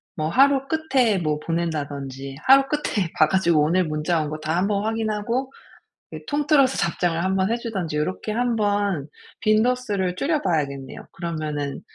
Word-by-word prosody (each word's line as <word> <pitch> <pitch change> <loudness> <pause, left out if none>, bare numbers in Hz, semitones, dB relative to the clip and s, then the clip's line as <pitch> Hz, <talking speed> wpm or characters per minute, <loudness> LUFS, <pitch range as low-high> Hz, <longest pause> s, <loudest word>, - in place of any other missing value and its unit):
뭐 155 -3 -2
하루 275 +7 +4
끝에 270 -9 +1
뭐 155 -4 -1
보낸다든지 145 -5 -4
하루 270 +1 +8
끝에 210 - -1
봐 155 - +5
가지고 170 -2 +2
오늘 175 +5 +2
문자 155 +2 0
온 150 - -4
거 155 +1 -5
다 155 +1 -2
1 185 +3 +1
번 200 -1 0
확인하고 225 +4 -2 0.6
이 - - -5
통틀어서 290 -2 +2
답장을 170 -1 0
1 190 +1 0
번 190 +2 +1
해주든지 220 -9 -3
요렇게 185 +7 -2
한번 205 - 0 0.3
빈도수를 215 -4 +1
줄여 300 - 0
봐야겠네요. 140 - -2
그러면은 155 -4 -4
185 Hz, 320 characters per minute, -23 LUFS, 155-230 Hz, 0.6 s, 하루